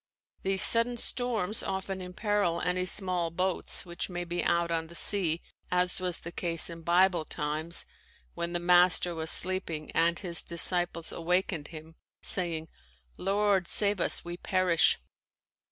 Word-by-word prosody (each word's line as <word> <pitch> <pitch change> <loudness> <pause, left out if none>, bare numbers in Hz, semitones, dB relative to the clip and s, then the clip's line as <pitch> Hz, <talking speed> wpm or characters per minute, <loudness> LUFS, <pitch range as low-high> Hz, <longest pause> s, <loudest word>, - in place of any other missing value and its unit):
These 190 0 +7
sudden 235 +1 +6
storms 225 -5 -1
often 190 0 -5
imperil 180 -1 -2
any 180 +1 -2
small 185 -3 +3
boats 180 +2 -2
which 175 +1 -4
may 175 -1 -5
be 175 0 -4
out 170 0 -1
on 165 -1 -3
the 170 - -14
sea 170 -4 +2 0.3
as 180 0 +1
was 180 -2 -1
the 170 - -10
case 170 -1 +1
in 165 0 -11
Bible 175 0 +1
times 155 +3 -4 0.5
when 170 0 -5
the 175 - -2
Master 175 0 +2
was 160 -1 -2
sleeping 170 -5 +1
and 170 +1 0
his 170 -3 -1
disciples 170 0 +1
awakened 175 -2 -2
him, 160 0 -13 0.3
saying: 165 -4 +1 0.5
"Lord, 195 -1 0
save 205 -3 0
us; - - 0
we 175 0 -7
perish." 185 -3 +1
175 Hz, 145 wpm, -27 LUFS, 170-190 Hz, 0.5 s, These